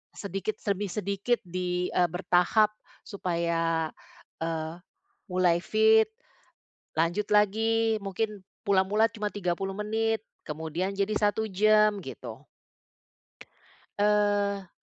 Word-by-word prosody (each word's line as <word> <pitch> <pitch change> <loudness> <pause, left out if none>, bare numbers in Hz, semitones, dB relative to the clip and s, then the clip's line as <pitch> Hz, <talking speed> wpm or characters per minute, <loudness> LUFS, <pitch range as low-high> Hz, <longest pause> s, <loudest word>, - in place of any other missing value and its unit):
sedikit 195 +1 -3
demi 200 0 -1
sedikit 200 +5 -1
di, 180 0 -2
eee, 180 -1 +3
bertahap 180 +4 +2 0.3
supaya, 170 -4 -1 0.5
eee, 160 0 -3 0.5
mulai 180 -2 +2
fit, 220 +3 +4 0.9
lanjut 175 +6 +1
lagi 225 +2 +3
mungkin 205 +1 -3 0.2
mula-mula 200 +3 +3
cuma 215 -2 -4
30 195 -1 -2
menit 220 +1 0 0.2
kemudian 160 +4 -3
jadi 200 +2 0
1 210 +1 +1
jam 210 +1 +4
gitu. 130 -7 -8 1.6
Eee. 205 -1 +2
200 Hz, 95 wpm, -28 LUFS, 175-210 Hz, 1.6 s, fit